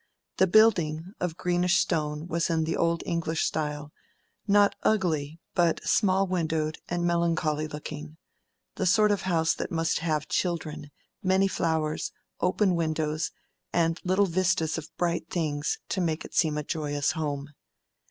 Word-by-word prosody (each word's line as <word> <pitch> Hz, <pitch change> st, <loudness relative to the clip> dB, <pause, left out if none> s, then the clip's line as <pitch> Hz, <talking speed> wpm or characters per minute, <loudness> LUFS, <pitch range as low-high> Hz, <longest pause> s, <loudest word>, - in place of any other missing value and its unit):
The 190 Hz, -, +4 dB
building, 180 Hz, -4 st, +3 dB
of 175 Hz, -2 st, -2 dB
greenish 180 Hz, 0 st, +2 dB
stone, 150 Hz, -2 st, 0 dB
was 170 Hz, 0 st, -1 dB
in 165 Hz, -1 st, +1 dB
the 160 Hz, -, -1 dB
old 170 Hz, 0 st, +1 dB
English 165 Hz, -1 st, -1 dB
style, 150 Hz, -1 st, -3 dB, 0.6 s
not 205 Hz, 0 st, +5 dB
ugly, 165 Hz, -7 st, 0 dB
but 170 Hz, -2 st, +2 dB
small 195 Hz, -2 st, +3 dB
windowed 160 Hz, -4 st, -1 dB
and 175 Hz, 0 st, -1 dB
melancholy 165 Hz, -3 st, +1 dB
looking: 150 Hz, 0 st, -7 dB, 0.6 s
the 190 Hz, -, 0 dB
sort 210 Hz, +3 st, +5 dB
of 205 Hz, -, +1 dB
house 165 Hz, -2 st, +2 dB
that -, -, -4 dB
must 165 Hz, -1 st, 0 dB
have 155 Hz, -2 st, -1 dB
children, 160 Hz, -4 st, -2 dB, 0.3 s
many 190 Hz, +1 st, +3 dB
flowers, 160 Hz, -4 st, -1 dB, 0.3 s
open 185 Hz, +1 st, +2 dB
windows, 155 Hz, -2 st, -1 dB, 0.4 s
and 165 Hz, 0 st, +1 dB
little 190 Hz, +2 st, +3 dB
vistas 175 Hz, -3 st, +1 dB
of 160 Hz, 0 st, -10 dB
bright 170 Hz, -2 st, -1 dB
things, 150 Hz, -4 st, -1 dB
to 190 Hz, -, -1 dB
make 160 Hz, -1 st, -1 dB
it -, -, -11 dB
seem 155 Hz, -3 st, +2 dB
a 150 Hz, -, -2 dB
joyous 145 Hz, -2 st, -1 dB
home. 145 Hz, -3 st, -3 dB
165 Hz, 145 wpm, -27 LUFS, 155-180 Hz, 0.6 s, not